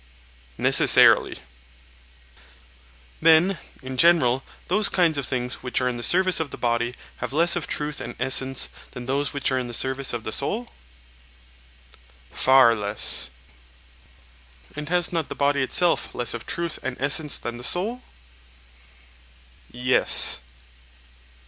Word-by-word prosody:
Necessarily. - - +4 1.8
Then, 165 +3 +4 0.2
in 130 0 -7
general, 135 -6 +3 0.3
those 210 -1 +3
kinds 165 -5 +1
of 135 - -2
things 125 -1 -4
which 125 -1 -2
are 125 - -1
in 125 -1 -3
the - - -7
service 185 +7 +3
of 160 -3 -3
the - - -9
body 120 0 -2 0.2
have - - -6
less 170 +4 +2
of 175 - -4
truth 150 0 -3
and - - -8
essence 130 0 +1 0.3
than 125 - -8
those 140 +3 -2
which 140 -1 -2
are 130 - 0
in 125 - -5
the 120 - -3
service 130 +2 -1
of 120 -2 -5
the 110 - -6
soul? 220 - -1 1.6
Far 130 -3 +4
less. 105 - -1 1.5
And 150 +1 -7
has 175 0 0
not 165 -3 -3
the - - -6
body 140 0 0
itself 170 +6 0
less 120 -1 -1
of 120 - -8
truth 170 -1 -3
and 130 -1 -6
essence 145 +2 +2
than 120 0 -6
the 120 - -10
soul? 210 - -1 1.7
Yes. 125 - +3
135 Hz, 135 wpm, -23 LUFS, 125-165 Hz, 1.8 s, Necessarily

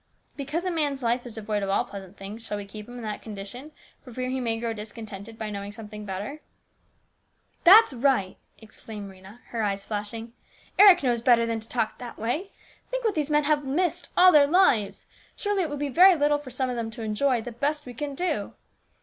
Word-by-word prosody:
' - - -44
Because 300 +5 -3
a 365 - 0
man's 290 -5 -1
life 240 +1 0
is 235 - -8
devoid 210 -1 -2
of 195 - -2
all 195 - +1
pleasant 195 -1 -10
things, 205 +4 -8
shall 210 -2 -4
we 205 - -6
keep 210 +2 -10
him 245 - -10
in 245 - -7
that 210 -1 -4
condition, 220 +7 -8 0.3
for 255 - -13
fear 255 +2 -3
he 260 - -1
may 230 -2 -1
grow 230 -1 -2
discontented 215 0 -8
by 220 -1 -4
knowing 200 0 -5
something 210 0 -9
better? 205 +10 -5 0.4
" - - -43
" - - -43
That's 395 -2 +8
right! 250 -7 +1
" - - -42
exclaimed 210 -2 -9
Rhena, 190 +5 -15
her 230 - -3
eyes 200 -2 -1
flashing. 225 +3 -5 0.2
" - - -24
Eric 390 -5 +8
knows 240 -3 +1
better 235 -1 +4
than 230 -1 -2
to 220 - -14
talk 225 -3 -1
that 245 -1 -8
way. 270 - -2 0.4
Think - - -3
what 440 - +2
these 300 -3 -1
men 295 0 +3
have 295 0 +1
missed 320 +7 -1
all 365 +1 +8
their 290 -3 +6
lives! 235 - +3 0.3
Surely 410 -2 0
it 330 - -1
will 290 - -4
be 290 +1 -2
very 360 +7 +7
little 295 -1 +2
for 290 -3 -10
some 255 +1 -2
of 250 - -3
them 230 -1 -3
to 225 +1 -8
enjoy, 240 +4 +1
the 245 - -6
best 295 +5 -2
we 250 - -8
can 285 +3 -5
do. 310 - -2
235 Hz, 230 wpm, -26 LUFS, 210-290 Hz, 0.4 s, That's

